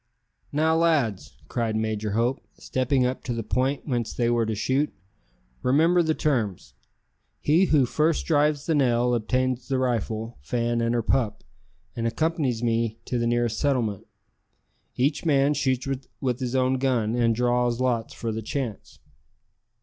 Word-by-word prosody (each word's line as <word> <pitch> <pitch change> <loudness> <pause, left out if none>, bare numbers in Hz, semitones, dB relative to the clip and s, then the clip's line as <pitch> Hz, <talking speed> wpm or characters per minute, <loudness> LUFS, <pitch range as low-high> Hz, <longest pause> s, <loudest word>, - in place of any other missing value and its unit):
"Now, 160 +2 +2
lads," 145 - +1
cried 115 -2 -1
Major 110 -1 -1
Hope, 120 +4 0 0.2
stepping 130 0 0
up 125 +1 -2
to 125 - -2
the 115 -1 -3
point 130 +7 -1
whence 120 -5 -2
they 120 -1 +1
were 115 -2 +1
to 110 - -1
shoot, 130 +7 0 0.7
"remember 165 +7 +4
the 160 -2 +1
terms. 105 - -1 0.7
He 165 +6 +3
who 150 -6 +4
first 155 +5 +1
drives 150 -2 +2
the 165 - +1
nail 125 -4 +2
obtains 125 +2 0
the 135 - 0
rifle, 115 - -2
Fan, 120 - -1
and 115 +1 +1
her 120 - 0
pup, 110 -3 0 0.5
and 115 0 -1
accompanies 140 -3 -1
me 115 -1 0
to 125 - -2
the 115 - 0
nearest 120 -2 0
settlement. 120 -9 0 0.9
Each 140 +4 0
man 145 -3 +3
shoots 130 -2 0 0.3
with 125 -2 -1
his 125 -1 -2
own 130 0 +2
gun, 120 -5 +1
and 115 -1 +2
draws 120 0 +1
lots 120 -3 0
for 115 - -3
the 110 +1 -3
chance." 115 -1 -5
125 Hz, 155 wpm, -25 LUFS, 115-140 Hz, 0.9 s, remember